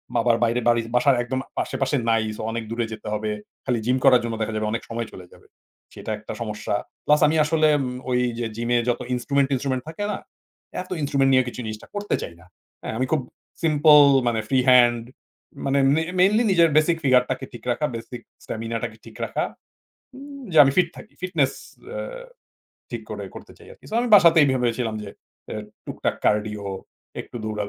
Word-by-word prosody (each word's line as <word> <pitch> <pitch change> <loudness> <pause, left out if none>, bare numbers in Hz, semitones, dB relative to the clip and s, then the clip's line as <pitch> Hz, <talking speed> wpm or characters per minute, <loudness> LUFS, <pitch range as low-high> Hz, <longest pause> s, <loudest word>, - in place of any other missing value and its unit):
আবার 115 0 +3
বাইরে 120 +1 +1
বালি 120 -1 +4
বাসার 130 +2 +4
একদম 130 +2 -3 0.2
আশেপাশে 135 +1 -1
নাই 115 -1 +3
সো - - -6
অনেক 115 0 -3
দূরে 115 0 -1
যেতে 110 0 -9
হবে। 105 0 -2 0.3
খালি 125 -3 0
জিম 125 +1 +2
করার 125 -2 +7
জন্য 115 -1 -3
দেখা 110 0 -2
যাবে 110 0 -1
অনেক 115 - -2
সময় 115 -1 -3
চলে 90 - -11
যাবে। - - -19 0.5
সেটা 110 - -6
একটা 105 - -8
সমস্যা। 105 -2 -3 0.3
প্লাস 150 0 +4
আমি 160 - +1
আসলে 155 +1 +2 0.4
ওই 125 0 +2 0.2
যে 120 - -1
জিম 120 +1 -3
এ - - +5
যত 120 - 0
ইনস্ট্রুমেন্ট, 135 +3 +1
টিনস্ট্রুমেন্ট 130 -1 -1
থাকে 185 +6 -5
না? - - -3 0.6
এত 185 - -11
ইনস্ট্রুমেন্ট 140 -2 +2
নিয়ে 130 0 +5
কিছু 125 - -6
জিনিসটা 110 -1 -7
করতে 205 0 -1
চাই 85 - -6
না। 90 - -18 0.4
হ্যাঁ। - - -4
আমি 130 - +1
খুব 155 -4 +2 0.4
সিম্পল 150 -1 +6 0.3
মানে 115 -2 +1
ফ্রি 130 -1 +3
হ্যান্ড 120 -2 +5 0.6
মানে 140 0 +2 0.2
মে 160 - +2 0.2
মেইনলি 210 +6 +4
নিজের 170 -3 +5
বেসিক 165 +2 +3
ফিগার 130 -2 +5
টাকে 130 +1 -3
ঠিক 120 - -10
রাখা, 150 +5 0
বেসিক 115 +1 -7 0.2
স্টামিনা 115 +1 -4
টাকে 110 - -5
ঠিক - - -13
রাখা। - - -2 0.7
হুম 280 +1 -10
যে - - -2
আমি 135 - +2
ফিট 180 -2 +4
থাকি। 215 - -12
ফিটনেস 160 -7 +1 0.4
এ্যা - - -5 0.9
ঠিক - - -5
করে - - -5
করতে - - -11
চাই - - -16
আরকি। - - -20
সো - - -5
আমি 245 - -1
বাসাতেই 165 -6 +7
ভেবেছিলাম 120 -3 -1
যে 100 - -7 0.4
এ্যা 110 - -4 0.3
টুকটাক - - -2
কার্ডিও, 105 -1 0 0.5
একটু - - -10
দৌড়া 105 -1 -2
125 Hz, 190 wpm, -23 LUFS, 115-150 Hz, 0.9 s, করার